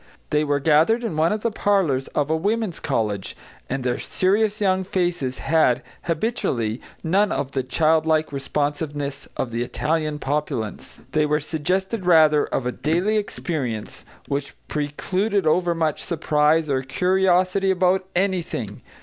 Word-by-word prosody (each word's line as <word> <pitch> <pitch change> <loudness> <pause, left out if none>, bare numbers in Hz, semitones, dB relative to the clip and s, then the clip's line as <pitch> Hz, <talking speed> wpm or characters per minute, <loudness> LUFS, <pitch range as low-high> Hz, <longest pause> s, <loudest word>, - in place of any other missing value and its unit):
They 150 0 +3
were 145 -1 +1
gathered 160 - +3
in 220 -9 -2
one 160 +2 +2
of 210 0 -1
the 230 - 0
parlours 190 -11 +1
of 145 +1 +1
a - - +3
women's 205 +2 -1
college, 110 -9 -2 0.3
and 135 -1 -2
their 125 -1 -1
serious 205 +3 +1
young 190 -2 +2
faces 175 -8 -1
had, 155 -6 +2 0.2
habitually, 150 - -1 0.2
none 195 +5 +2
of 140 -1 -2
the 135 - 0
childlike 155 +3 +2
responsiveness 145 0 -3
of 125 - -2
the 115 +1 -2
Italian 150 +4 -1
populace; 135 -6 -3
they 155 -1 +2
were 150 0 +2
suggestive, 180 +6 -2
rather, 155 -3 +5
of 130 - -2
a 125 - 0
daily 175 - 0
experience 140 - -3 0.2
which 140 0 -3
precluded 185 +7 -1
over 170 +2 +2
much 160 -2 0
surprise 155 -1 +2
or 135 -2 0
curiosity 185 +5 +2
about 185 0 +2
anything. 175 - -1
160 Hz, 140 wpm, -23 LUFS, 145-185 Hz, 0.3 s, rather